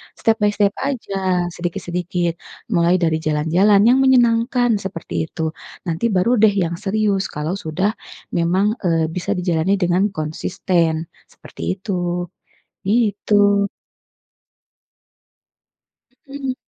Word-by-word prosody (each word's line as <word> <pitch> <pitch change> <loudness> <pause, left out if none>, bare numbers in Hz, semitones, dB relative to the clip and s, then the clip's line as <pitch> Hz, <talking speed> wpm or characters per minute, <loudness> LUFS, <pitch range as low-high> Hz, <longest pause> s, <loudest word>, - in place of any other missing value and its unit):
step 225 -1 +1
by 210 -1 +3
step 200 -1 +2
saja 190 -9 -1
sedikit-sedikit, 175 0 -2 0.4
mulai 175 -3 +3
dari 160 -2 +2
jalan-jalan 160 +6 +3
yang 255 - +5
menyenangkan 245 -2 +3
seperti 165 - -4
itu. 160 0 -3 0.4
Nanti 165 +8 0
baru 210 +7 +2
deh 215 -1 +5
yang 170 -4 -1
serius 205 -1 0
kalau 155 +6 -3
sudah 190 +3 -1 0.5
memang, 190 +6 +1
eee, 165 -2 +2
bisa 175 +2 -2
dijalani 180 +1 +1
dengan 185 +3 +2
konsisten 160 +1 -1 0.2
seperti - - -6
itu, 180 -3 -3 0.6
gitu. 205 -1 +2 2.6
Mhm. 275 -2 -4
190 Hz, 105 wpm, -20 LUFS, 170-210 Hz, 2.6 s, yang